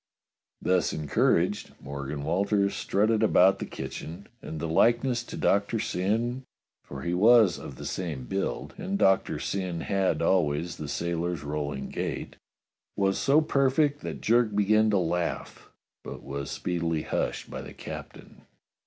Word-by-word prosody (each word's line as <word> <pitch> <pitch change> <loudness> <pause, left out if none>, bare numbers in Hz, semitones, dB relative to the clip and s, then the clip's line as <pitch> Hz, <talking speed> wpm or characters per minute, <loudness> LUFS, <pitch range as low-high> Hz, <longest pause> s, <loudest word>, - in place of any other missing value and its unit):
Thus 90 -2 +2
encouraged, 85 +6 +1
Morgan 70 +1 -5
Walters 100 +5 +1
strutted 110 +2 +1
about 95 -3 +5
the - - -4
kitchen, 85 +5 -7 0.2
and 80 - -6
the 80 - -2
likeness 120 +8 +3
to - - -7
Doctor 100 +3 +2
Syn 115 +8 -1 0.4
(for 70 -1 -8
he 85 - -1
was 110 0 +5
of - - -8
the - - -9
same 80 -8 -4
build 95 +10 -3
and 195 +1 -2
Doctor 95 - +3
Syn 90 -4 -3
had 95 -5 0
always 85 -1 +1
the 75 - -6
sailor's 85 0 -2
rolling 75 -2 -3
gait) - - -4 0.6
was 95 -1 +1
so 145 +3 +4
perfect 145 0 +2
that 80 -6 -6
Jerk 115 - +3
began 110 +2 +4
to 105 - +3
laugh, 85 -1 -2 0.3
but - - -8
was 70 0 -5
speedily 85 -2 -2
hushed - - -2
by - - -5
the - - -9
captain. - - -9
95 Hz, 145 wpm, -27 LUFS, 80-110 Hz, 0.6 s, about